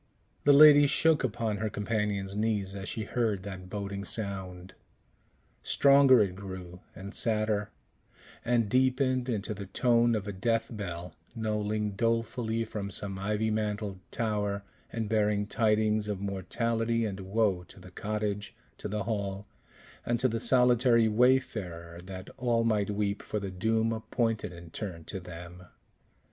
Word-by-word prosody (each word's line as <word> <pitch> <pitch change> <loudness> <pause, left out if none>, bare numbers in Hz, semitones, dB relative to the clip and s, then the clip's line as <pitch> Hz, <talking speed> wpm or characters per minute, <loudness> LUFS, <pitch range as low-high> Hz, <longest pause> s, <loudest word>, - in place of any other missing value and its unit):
The 145 - +7
lady 145 0 +9
shook 155 +2 +3
upon 115 -3 -1
her 110 +1 -2
companion's 100 -2 -2
knees 105 -3 -1
as 100 0 -6
she 110 - -3
heard 105 -3 -1
that 95 -2 -8
boding 100 0 -4
sound. 95 -4 -4 0.9
Stronger 140 -4 +6
it 95 -3 -3
grew 95 -2 -8 0.2
and 100 +2 -8
sadder, 110 -2 0 0.7
and 115 -2 +2
deepened 130 +1 +2
into 105 -2 -2
the 100 -1 -7
tone 120 +3 +3
of 105 -2 -3
a 100 - -3
death 115 +4 -1
bell, 90 -4 -6 0.2
knolling 105 -1 -1
dolefully 115 0 0
from 105 -2 -5
some 95 0 -3
ivy 105 +2 0
mantled 105 -2 -2
tower, 105 -3 -1 0.3
and 115 -2 -3
bearing 105 -1 +1
tidings 110 -1 +1
of 105 -2 -3
mortality 115 +4 -1
and 100 -2 -4
woe 95 -1 0
to - - -14
the - - -13
cottage, 105 0 -3 0.2
to - - -4
the 105 0 -2
hall, 100 -2 -3 0.6
and 120 0 0
to 130 - +3
the 115 -2 -2
solitary 125 -1 +4
wayfarer 105 -8 +1
that 95 0 -8
all 120 -2 +1
might 105 -3 +1
weep 100 0 -1
for 105 - -3
the 100 -1 -5
doom 110 +4 +1
appointed 115 -2 -1
in 85 -1 -11
turn 90 -6 -6
to 95 - -6
them. 90 0 -10
105 Hz, 145 wpm, -29 LUFS, 100-115 Hz, 0.9 s, lady